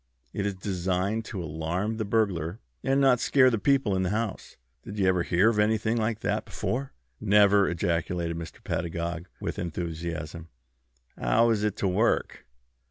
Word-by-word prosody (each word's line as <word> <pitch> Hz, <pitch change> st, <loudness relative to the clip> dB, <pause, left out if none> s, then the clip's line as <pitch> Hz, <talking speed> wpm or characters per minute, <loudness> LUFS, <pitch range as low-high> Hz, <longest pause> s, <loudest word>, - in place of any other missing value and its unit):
It 100 Hz, -, -1 dB
is 100 Hz, -, -2 dB
designed 95 Hz, +3 st, -1 dB
to 95 Hz, -4 st, -5 dB
alarm 85 Hz, +8 st, -2 dB
the 110 Hz, -, -2 dB
burglar, 100 Hz, -4 st, 0 dB, 0.2 s
and 135 Hz, +1 st, +2 dB
not 135 Hz, -3 st, +5 dB
scare 130 Hz, 0 st, +4 dB
the 115 Hz, -, 0 dB
people 130 Hz, -3 st, +2 dB
in 95 Hz, -, +1 dB
the 90 Hz, -, 0 dB
house. 110 Hz, +1 st, -3 dB, 0.3 s
Did 100 Hz, -, -8 dB
you 100 Hz, -, +2 dB
ever 95 Hz, -1 st, +3 dB
hear 90 Hz, +4 st, +3 dB
of 105 Hz, -, -1 dB
anything 110 Hz, +1 st, +2 dB
like 110 Hz, -1 st, -1 dB
that -, -, -1 dB
before?" 135 Hz, +3 st, -3 dB, 0.3 s
"Never!" 100 Hz, -1 st, +5 dB
ejaculated 85 Hz, 0 st, -1 dB
Mr. 85 Hz, -1 st, -8 dB
Pedagog, 85 Hz, +1 st, -3 dB
with -, -, -4 dB
enthusiasm. 85 Hz, -1 st, -5 dB, 0.7 s
"How 115 Hz, +1 st, +3 dB
is 105 Hz, -2 st, 0 dB
it 105 Hz, -2 st, 0 dB
to 100 Hz, -, -1 dB
work?" 100 Hz, +6 st, 0 dB
100 Hz, 165 wpm, -27 LUFS, 85-110 Hz, 0.7 s, not